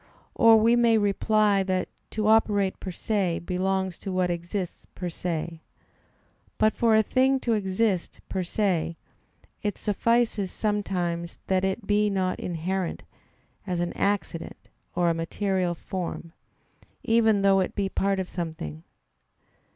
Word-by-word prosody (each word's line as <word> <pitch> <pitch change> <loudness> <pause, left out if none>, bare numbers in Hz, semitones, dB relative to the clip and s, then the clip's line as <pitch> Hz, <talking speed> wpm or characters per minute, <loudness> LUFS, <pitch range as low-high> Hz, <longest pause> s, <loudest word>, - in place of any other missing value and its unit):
Or 225 -1 +7
we 230 +2 +4
may 235 -2 +4
reply 205 0 +2
that 185 -1 -1 0.2
to 215 -1 -2
operate 210 -3 +3
per 190 - -6
se 185 -1 -1
belongs 190 0 -1
to 195 - -5
what 185 -1 +1
exists 175 +2 -4
per 180 -1 -3
se. 165 -1 -4 1.0
But 215 0 +3
for 230 -2 +3
a 220 - +5
thing 265 +4 +2
to 235 - +1
exist 195 -2 0
per 190 - -2
se, 175 -3 0 0.6
it 205 -2 -2
suffices 220 -2 +1
sometimes 180 -5 -2
that 190 -1 +1
it 190 +3 -1
be 210 +1 +2
not 190 -2 -1
inherent, 180 +2 -3 0.6
as 180 -2 -1
an 175 0 -1
accident 200 -4 -2 0.3
or 175 -1 +3
a - - +1
material 180 +2 -1
form; 170 -1 -5 0.7
even 220 -3 +3
though 195 -1 +5
it 185 - -1
be 200 -1 0
part 195 0 0
of 185 - -2
something. 160 - -5
190 Hz, 135 wpm, -26 LUFS, 175-210 Hz, 1.0 s, Or